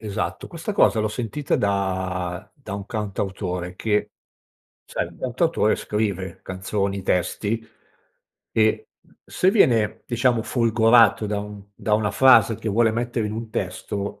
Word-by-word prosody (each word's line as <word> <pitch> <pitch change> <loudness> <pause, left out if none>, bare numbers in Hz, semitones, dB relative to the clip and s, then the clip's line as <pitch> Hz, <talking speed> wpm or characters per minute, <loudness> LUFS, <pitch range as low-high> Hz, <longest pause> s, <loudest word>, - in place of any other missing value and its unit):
Esatto, 105 -3 -4
questa - - -5
cosa 110 - +4
l'ho 110 - 0
sentita 120 +5 -2
da 95 -3 -1
da 135 -10 -8
un 100 -1 -6
cantautore 95 -4 -3
che 105 0 0 0.7
sai, - - -3
il - - -16
cantautore 130 -3 +1
scrive 100 -4 -3
canzoni, 95 +1 -3
testi, 105 +5 -1 0.9
e 110 -1 +2 0.4
se 185 - +2
viene 115 - +3
diciamo 120 -1 +1
folgorato 115 -1 +4
da 105 0 -2
un 105 -1 -9
da 105 - 0
una 105 -1 +1
frase 115 -4 +5
che 110 - -4
vuole 110 +2 +3
mettere 120 -1 -1
in 105 - -4
un 110 0 -6
testo 100 +1 -4
105 Hz, 135 wpm, -23 LUFS, 100-115 Hz, 0.9 s, frase